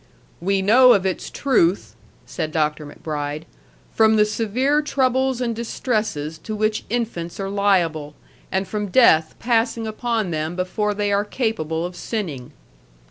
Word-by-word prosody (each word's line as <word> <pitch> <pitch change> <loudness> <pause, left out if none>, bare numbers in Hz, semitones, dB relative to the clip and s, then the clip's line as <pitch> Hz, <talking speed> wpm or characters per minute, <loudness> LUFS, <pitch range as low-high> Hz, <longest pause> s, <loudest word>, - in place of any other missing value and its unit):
"We 195 +2 +1
know 250 +5 +7
of 195 -1 +1
its 190 - -2
truth," 180 - +1 0.3
said 155 +5 -4
Dr. 150 -1 -1
MacBride, 150 0 -5 0.5
"from 220 0 +4
the 210 -1 +5
severe 235 +7 0
troubles 260 -3 +1
and 235 -2 -1
distresses 215 - -2
to 215 +4 -6
which 215 0 -1
infants 215 -8 -3
are 195 0 -3
liable, 170 -7 +1 0.4
and 190 0 -1
from 210 -1 -3
death 165 -7 +4
passing 230 -1 0
upon 220 -3 -2
them 155 +1 -2
before 205 +3 -1
they 205 0 -1
are 200 +1 +2
capable 175 - -2
of 180 0 -6
sinning." 155 - -5
205 Hz, 140 wpm, -22 LUFS, 165-230 Hz, 0.5 s, know